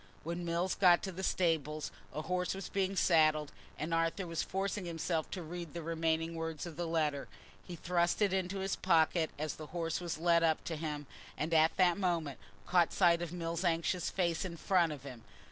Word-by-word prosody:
When 170 +2 -4
Mills 170 +2 0
got 180 -3 +5
to 190 - -3
the 185 +1 -6
stables, 155 -5 0 0.2
a 155 - -4
horse 180 +3 -1
was 195 - -6
being 195 0 0
saddled, 155 -5 +3 0.3
and 160 +2 -3
Arthur 165 +3 0
was 165 -1 -2
forcing 195 0 -2
himself 165 -1 -2
to 180 - -5
read 170 0 -7
the 170 - -4
remaining 165 0 0
words 165 -1 -4
of 170 -3 -7
the 175 +1 -3
letter. 150 -4 0 0.4
He 175 - -8
thrust 175 +1 +1
it 205 -3 +2
into 190 +1 -1
his 195 0 -1
pocket 160 0 +3
as 155 0 -2
the 155 - -8
horse 165 0 -2
was 170 -3 -3
led 170 +1 +3
up 160 -1 +2
to 165 - -3
him, 150 -2 -4 0.3
and 160 +2 -2
at 160 0 +4
that 180 0 +4
moment 170 -7 -1 0.3
caught 175 -2 +3
sight 170 -3 +4
of 170 -2 -4
Mills' 170 0 -3
anxious 170 0 +1
face 170 -3 0
in 175 -3 -5
front 175 -1 +2
of 145 -3 -7
him. 125 -5 -9
170 Hz, 200 wpm, -33 LUFS, 160-180 Hz, 0.4 s, got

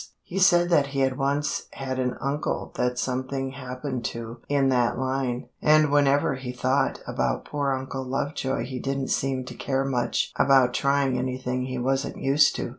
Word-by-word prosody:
He 195 - -4
said 175 -2 +5
that 145 -4 +4
he 140 -1 -2
had 130 -1 +2
once 140 +2 0
had 130 -1 -4
an 125 -1 -1
uncle 140 +3 -2
that 125 0 -1
something 130 +1 -2
happened 130 -1 -5
to 115 0 -5
in 140 -2 +3
that 125 -2 +2
line, 130 -1 -2
and 155 -1 +5
whenever 145 -1 +3
he 130 -1 -5
thought 130 +2 0
about - - -1
poor 145 -2 -1
Uncle 130 0 -3
Lovejoy 135 +1 -2
he 130 -1 -5
didn't 135 +1 -2
seem 130 -1 0
to - - -8
care 135 0 -1
much 125 -3 0
about 130 -3 +5
trying 140 -2 +1
anything 125 0 -2
he 130 0 -4
wasn't 135 +2 -1
used 145 +2 +3
to. - - -3
135 Hz, 175 wpm, -25 LUFS, 130-140 Hz, -, said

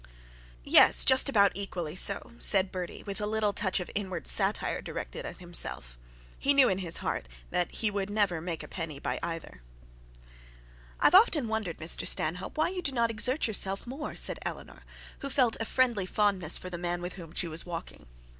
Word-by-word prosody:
'Yes, - - +7
just 260 +1 +5
about 200 -6 +4
equally 175 -5 -5
so,' 200 +1 +1
said 190 -2 +2
Bertie 180 -2 -6
with 200 +1 -6
a 210 - -1
little 215 -1 0
touch 190 -2 0
of 180 - -6
inward 190 -4 -4
satire 195 +1 +1
directed - - -6
at - - -8
himself. 170 - -3 0.4
He 280 +1 +2
knew 270 -2 +6
in 190 - -1
his 170 -3 +1
heart - - -3 0.2
that 175 - 0
he 215 -2 -1
would 200 -1 -3
never 205 -6 0
make 170 -2 -5
a - - -9
penny 165 -5 -5
by - - -3
either. 165 - -6 1.4
'I - - +1
have - - +6
often 355 - +5
wondered, 220 -6 -3
Mr 160 +1 0
Stanhope, 180 - 0
why 315 - +2
you 365 0 -4
do 290 - -2
not 235 -3 +1
exert 250 +6 +3
yourself 195 -3 +1
more,' 275 +5 -6
said - - -1
Eleanor, - - -7 0.4
who 275 - -5
felt 255 -4 +2
a 225 - -2
friendly 235 -7 +1
fondness 195 -5 +1
for 185 - -8
the 175 - -5
man 175 0 -3
with 180 - -5
whom 170 -4 -10
she 175 - -1
was 160 0 -4
walking. 170 - -8
195 Hz, 190 wpm, -29 LUFS, 175-225 Hz, 1.4 s, Yes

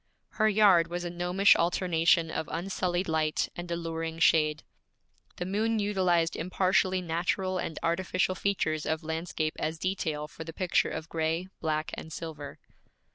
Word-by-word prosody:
Her 215 0 +2
yard 195 -5 +5
was 175 +1 -4
a 175 - -4
gnomish 180 +3 +4
alternation 170 -1 +2
of 160 - -3
unsullied 180 +1 -1
light 155 -1 0
and 175 0 -6
alluring 165 -1 -3
shade. 155 -2 +3 0.7
The 180 - -4
moon 220 +4 0
utilized 185 -5 +1
impartially 185 +1 +1
natural 180 +3 -1
and 160 - -4
artificial 185 +2 0
features 165 -6 -1
of 160 0 -1
landscape 160 -1 -2
as 160 +1 -2
detail 160 -4 -2
for 160 - -9
the 165 0 -8
picture 180 +1 +1
of 160 - -5
gray, 165 +3 -1
black, 155 -1 -1
and 160 - -7
silver. 155 -3 -7
170 Hz, 145 wpm, -29 LUFS, 160-185 Hz, 0.7 s, yard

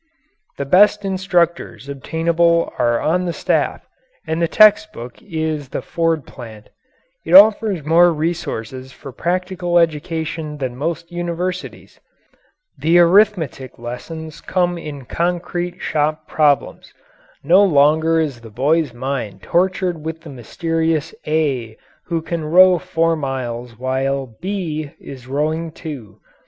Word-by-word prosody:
The 140 - -3
best 205 +6 +4
instructors 175 - -1
obtainable 170 +4 0
are 120 0 +2
on 180 +3 0
the 170 - -2
staff, - - -1 0.4
and 160 +1 -2
the 170 - +2
text 215 +2 +5
book 120 +1 -10
is 155 -5 -3
the - - -5
Ford 165 -4 -1
plant. 110 -4 -12 0.5
It - - +2
offers 215 - +6
more 170 +3 +5
resources 130 -6 -4
for 135 +1 -11
practical 175 +3 -1
education 160 -1 -1
than 130 -3 -4
most 165 +5 -4
universities. 175 +1 -5 0.8
The 165 +3 +3
arithmetic 175 - +3
lessons 155 +7 -8
come 180 -1 0
in 145 -5 -8
concrete 175 +3 -2
shop 155 0 -1
problems. 150 -3 0 0.5
No 185 +4 +5
longer 160 -1 +3
is 140 -7 -2
the 115 - -11
boy's 140 +4 0
mind 130 -5 -4
tortured 180 -2 0
with 160 0 -5
the 160 -3 -11
mysterious 160 +5 -2
A 135 -8 -1 0.3
who 165 -2 -2
can 170 -1 -4
row 180 +3 +6
four 165 +1 0
miles 125 -5 -5
while 130 -1 -2
B 165 -6 -4
is 130 -3 -11
rowing 155 +4 -2
two. 145 - -9
160 Hz, 125 wpm, -19 LUFS, 135-175 Hz, 0.8 s, offers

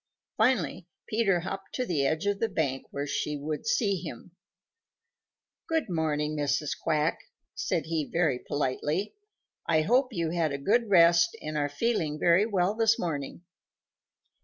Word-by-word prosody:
Finally 190 - +1 0.2
Peter 205 -5 +1
hopped 195 +2 -6
to 255 - -1
the 145 - +1
edge 160 +5 -1
of 205 -1 0
the 225 - 0
bank 140 -8 -1
where 140 0 -4
she 150 +1 -2
would 150 +7 -4
see 215 -3 +2
him. 165 -2 -8 1.4
"Good 320 - 0
morning, 155 -2 -1
Mrs. 145 0 0
Quack," 155 +1 0 0.3
said - - -1
he 160 -2 -2
very 160 -7 +1
politely. 150 +9 -2 0.5
"I 160 -1 +3
hope 250 - +3
you 170 -6 -2
had 165 -4 0
a - - -2
good 220 - +1
rest 170 +4 +5
and 155 -4 -6
are 145 -1 0
feeling 155 -2 -1
very 170 +6 +4
well 195 -2 +1
this 225 0 +3
morning." 150 -1 -4
170 Hz, 150 wpm, -28 LUFS, 150-205 Hz, 1.4 s, rest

